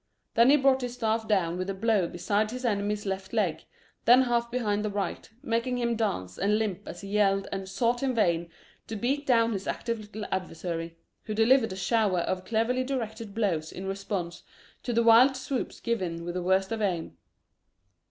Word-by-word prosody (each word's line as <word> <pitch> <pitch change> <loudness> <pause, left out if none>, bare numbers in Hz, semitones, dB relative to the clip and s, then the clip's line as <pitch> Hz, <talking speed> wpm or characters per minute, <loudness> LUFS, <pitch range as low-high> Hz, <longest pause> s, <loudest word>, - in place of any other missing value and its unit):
Then 235 +2 +5
he 290 - +7
brought 265 -1 +3
his 245 -1 -4
staff 225 -2 -1
down 180 -4 +1
with 185 +1 -3
a 195 - -2
blow 205 -3 +2
beside 205 +5 0
his 250 +2 -5
enemy's 205 -1 -1
left 190 0 -4
leg, - - 0 0.4
then 250 +2 +7
half 235 -1 0
behind 215 -4 -1
the 215 - -1
right, 200 -3 -3
making 240 0 0
him 235 -1 0
dance 95 - -2
and 205 +3 +2
limp 210 -5 -2
as 175 - -7
he 200 - -8
yelled 195 -1 +2
and 195 -1 -4
sought 235 +4 0
in 265 -2 0
vain 170 -6 +1 0.4
to 225 - -5
beat 275 +6 -1
down 230 -2 +4
his 195 -1 -4
active 230 -1 -2
little 210 0 -7
adversary, 165 -2 -4 0.3
who 215 - -3
delivered 225 0 +4
a - - -6
shower 195 -1 +1
of 185 +1 -2
cleverly 230 +5 +1
directed 225 -5 -4
blows 175 -8 0
in 190 - -7
response 195 -3 -4 0.4
to 245 - -3
the 235 0 +2
wild 240 +4 +6
swoops 260 0 -4
given 180 -8 -2
with 175 - -4
the 180 - -2
worst 190 +3 +1
of 225 -1 -2
aim. 180 -5 -1
215 Hz, 190 wpm, -28 LUFS, 190-235 Hz, 0.4 s, he